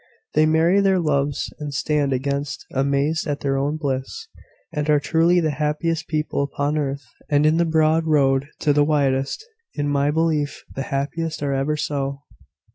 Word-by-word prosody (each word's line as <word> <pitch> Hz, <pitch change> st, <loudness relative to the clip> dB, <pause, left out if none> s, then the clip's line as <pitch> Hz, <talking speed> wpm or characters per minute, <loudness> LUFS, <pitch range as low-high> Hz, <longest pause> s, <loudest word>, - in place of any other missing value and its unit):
They 155 Hz, +1 st, +4 dB
marry 165 Hz, +5 st, +3 dB
their 195 Hz, -1 st, +3 dB
loves 145 Hz, -3 st, -1 dB
and 150 Hz, -1 st, -5 dB
stand 145 Hz, +1 st, 0 dB, 0.6 s
amazed 140 Hz, +3 st, 0 dB
at 145 Hz, -1 st, -2 dB
their 135 Hz, -1 st, 0 dB
own 145 Hz, +3 st, 0 dB
bliss, 140 Hz, -, -4 dB, 0.5 s
and 150 Hz, -1 st, -2 dB
are 150 Hz, -1 st, +5 dB
truly 165 Hz, +4 st, +3 dB
the 160 Hz, -3 st, +1 dB
happiest 155 Hz, +3 st, -1 dB
people 155 Hz, -2 st, -1 dB
upon 145 Hz, +1 st, -1 dB
earth, 140 Hz, -3 st, -2 dB, 0.2 s
and 145 Hz, 0 st, +3 dB
in 155 Hz, +1 st, +4 dB
the 170 Hz, -, +3 dB
broad 160 Hz, 0 st, +2 dB
road 140 Hz, -3 st, +3 dB
to -, -, 0 dB
be -, -, +6 dB
the 145 Hz, -, +6 dB
wisest. 140 Hz, -, 0 dB, 0.3 s
In 145 Hz, 0 st, -1 dB
my 145 Hz, 0 st, +1 dB
belief, 155 Hz, -2 st, 0 dB
the 135 Hz, -, -4 dB
happiest 150 Hz, +3 st, -2 dB
are 140 Hz, -1 st, 0 dB
ever 140 Hz, +3 st, 0 dB
so." 140 Hz, -2 st, -3 dB
150 Hz, 170 wpm, -22 LUFS, 140-160 Hz, 0.6 s, be